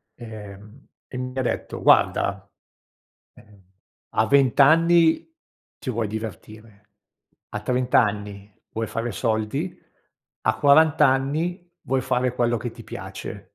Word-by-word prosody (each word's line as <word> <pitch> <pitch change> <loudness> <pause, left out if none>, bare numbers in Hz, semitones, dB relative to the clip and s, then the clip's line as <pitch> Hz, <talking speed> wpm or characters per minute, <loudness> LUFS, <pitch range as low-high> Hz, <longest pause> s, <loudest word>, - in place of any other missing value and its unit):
ehm, 105 +1 -11 0.2
e 125 - -8
mi 125 +1 -5
ha - - +1
detto: 125 - -3
"Guarda, 100 0 +2 0.9
ehm, 105 -2 -20 0.5
a 110 - +1
20 140 -1 +4
anni 165 - +4 0.4
ti 130 - -6
vuoi 115 -2 -2
divertire, 110 -1 -9 0.6
a - - -5
30 125 0 +2
anni 105 -2 -4 0.2
vuoi 110 0 -4
fare 115 +1 -3
soldi, 110 - -2 0.6
a - - 0
40 145 +1 +5
anni 155 +7 -1 0.2
vuoi 130 0 -1
fare 125 0 0
quello 120 -1 +1
che 120 0 -5
ti 115 - -12
piace". 100 0 -8
120 Hz, 125 wpm, -23 LUFS, 105-135 Hz, 0.9 s, 40